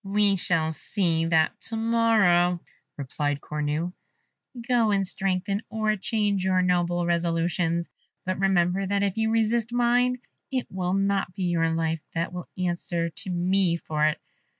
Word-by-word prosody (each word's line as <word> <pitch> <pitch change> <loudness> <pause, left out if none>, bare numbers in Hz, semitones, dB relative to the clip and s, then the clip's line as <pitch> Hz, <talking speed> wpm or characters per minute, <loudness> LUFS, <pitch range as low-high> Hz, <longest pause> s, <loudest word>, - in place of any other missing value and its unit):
"We 200 0 +2
shall 165 -3 +1
see 165 -2 0
that 160 -1 +2
to 225 - -3
morrow," 220 -6 +3 0.4
replied 145 +1 -2
Cornue. 150 +4 -3 0.7
"Go 240 -3 +3
and 195 -2 +1
strengthen 195 +2 -1
or 215 -1 0
change 205 -1 0
your 185 -1 +2
noble 175 -1 +1
resolutions; 170 0 0 0.4
but 185 0 -2
remember 190 0 +2
that 200 +1 0
if 195 -2 0
you 220 0 +1
resist 225 +1 +1
mine, 245 +1 +2 0.3
it 260 -2 -1
will 185 -1 -2
not 195 -2 0
be 195 - -3
your 170 -2 +1
life 165 -1 -1
that 170 +2 -2
will 180 -1 -7
answer 175 -1 -1
to 200 +3 -8
me 180 0 +2
for 155 -2 0
it. 155 - -1
185 Hz, 150 wpm, -26 LUFS, 170-205 Hz, 0.7 s, morrow